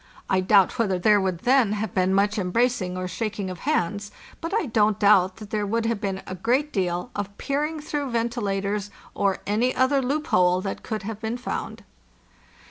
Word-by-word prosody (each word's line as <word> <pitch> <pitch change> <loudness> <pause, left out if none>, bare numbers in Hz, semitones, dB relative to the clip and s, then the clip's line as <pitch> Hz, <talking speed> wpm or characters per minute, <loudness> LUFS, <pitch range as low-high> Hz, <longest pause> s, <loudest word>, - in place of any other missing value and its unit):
I 190 - +4
doubt 195 +4 +4
whether 195 -5 +2
there 205 +3 +4
would 185 -3 -2
then 250 -4 +3
have 210 -2 -3
been 185 0 +2
much 205 +2 +2
em 180 -2 -2
bracing 230 -4 0
or 185 0 -3
shaking 205 0 -3
of 180 - -8
hands, 205 - -1 0.3
but 330 - -4
I 430 -2 +1
don't 215 -4 +2
doubt 190 -3 +4
that 210 -3 -11
there 210 -1 -1
would 230 +2 0
have 225 -2 -1
been 195 -2 -3
a - - -6
great 250 - 0
deal 180 -2 -1
of 200 0 -5
peering 300 +3 -2
through 295 -2 -3
venti 235 0 -1
lators 200 0 -2 0.2
or 195 -2 0
any 225 +5 +1
other 270 +1 +3
loophole 185 -10 +2
that 195 0 -4
could 215 -3 -4
have 215 +1 -5
been 225 +2 -2
found. 245 - -5
210 Hz, 195 wpm, -24 LUFS, 190-240 Hz, 0.3 s, I